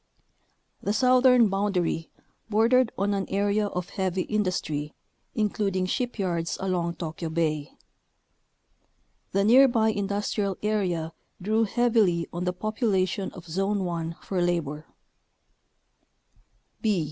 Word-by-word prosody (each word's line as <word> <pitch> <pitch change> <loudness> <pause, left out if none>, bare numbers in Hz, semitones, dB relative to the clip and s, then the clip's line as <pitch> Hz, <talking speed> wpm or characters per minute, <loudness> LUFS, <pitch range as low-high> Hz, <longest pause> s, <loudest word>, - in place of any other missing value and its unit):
The 205 - -1
southern 250 0 +5
boundary 195 -5 -1 0.4
bordered 230 +3 +3
on 200 +1 +1
an 195 -1 -2
area 205 +1 +1
of 180 -2 -4
heavy 185 -1 -1
industry, 170 -8 -2 0.4
including 200 -3 0
shipyards 185 -7 -2
along 175 -3 -1
Tokyo 160 0 -5
Bay. 155 -3 -1 1.6
The 195 +1 +2
near 255 +6 +7
by 225 -3 +2
industrial 200 -1 -1
area 180 -7 -1 0.3
drew 215 +4 +1
heavily 220 -7 +2
on 175 +1 -3
the 180 - +1
population 195 -2 -1
of 175 - -11
Zone 195 +4 -1
1 165 -1 -3
for 185 -2 -2
labor. 160 -3 -1
195 Hz, 105 wpm, -26 LUFS, 175-215 Hz, 1.6 s, near